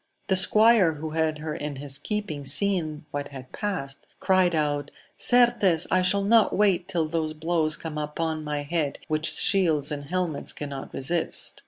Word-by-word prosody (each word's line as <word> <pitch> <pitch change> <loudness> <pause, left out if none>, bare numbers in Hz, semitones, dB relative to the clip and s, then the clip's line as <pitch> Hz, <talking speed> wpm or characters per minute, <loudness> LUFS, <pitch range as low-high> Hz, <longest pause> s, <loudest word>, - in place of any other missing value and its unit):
The 190 - +3
squire 210 -1 +5
who 155 +1 -6
had 160 -1 0
her 155 0 -5
in 150 -1 -5
his 140 0 -4
keeping 205 -5 -4
seeing 155 0 +2
what 145 0 -4
had 130 -2 -11
passed, 160 -10 -4
cried 185 -3 +2
Out, 145 -2 -1 0.3
Certes 240 -9 +3
I 185 - +3
shall 195 +2 +2
not 225 +1 +3
wait 190 -4 +2
till 170 -5 -1
those 155 -1 -2
blows 160 -1 0
come 155 -2 -6
upon 155 +1 -3
my 150 -1 -3
head 150 -1 -2
which 155 0 0
shields 155 -5 +2
and 145 -1 -5
helmets 175 -5 -2
cannot 140 -2 -7
resist 165 +6 -3
160 Hz, 165 wpm, -25 LUFS, 150-185 Hz, 0.3 s, squire